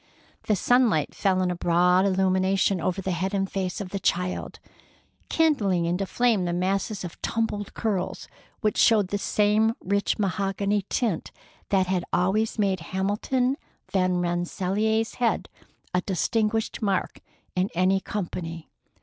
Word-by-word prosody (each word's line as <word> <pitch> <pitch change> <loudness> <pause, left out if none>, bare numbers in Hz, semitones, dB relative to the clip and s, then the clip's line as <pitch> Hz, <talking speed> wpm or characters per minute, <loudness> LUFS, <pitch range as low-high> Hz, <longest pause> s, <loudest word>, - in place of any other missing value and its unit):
The 215 - +3
sunlight 235 - +2
fell 185 -2 +1
in 180 - +1
a - - -2
broad 180 +2 +3
illumination 190 -1 +2
over 185 +3 -1
the 190 - -1
head 190 +3 -1
and 195 0 0
face 190 -2 -3
of 200 -3 -5
the 200 - -3
child, 180 0 -1 0.7
kindling 210 - +2
into 180 +3 -1
flame 230 -6 +2
the 175 - -1
masses 195 +3 -1
of 175 - -8
tumbled 210 -3 -2
curls 200 -5 -2 0.3
which 215 -3 0
showed 210 -5 +4
the 205 - -1
same 215 +3 +2
rich 200 +2 0
mahogany 200 0 0
tint 220 -10 -1 0.4
that 190 -2 +3
had 180 -1 0
always 200 +6 +1
made 195 -3 +1
Hamilton 205 - -1 0.4
Van 185 -2 +2
Rensselaer's 190 +5 0
head 235 - +1 0.5
a 180 - +2
distinguished 220 +5 0
mark 195 -3 -1 0.4
in 185 +2 +1
any 185 +2 +3
company. 170 -5 -5
195 Hz, 140 wpm, -26 LUFS, 180-210 Hz, 0.7 s, showed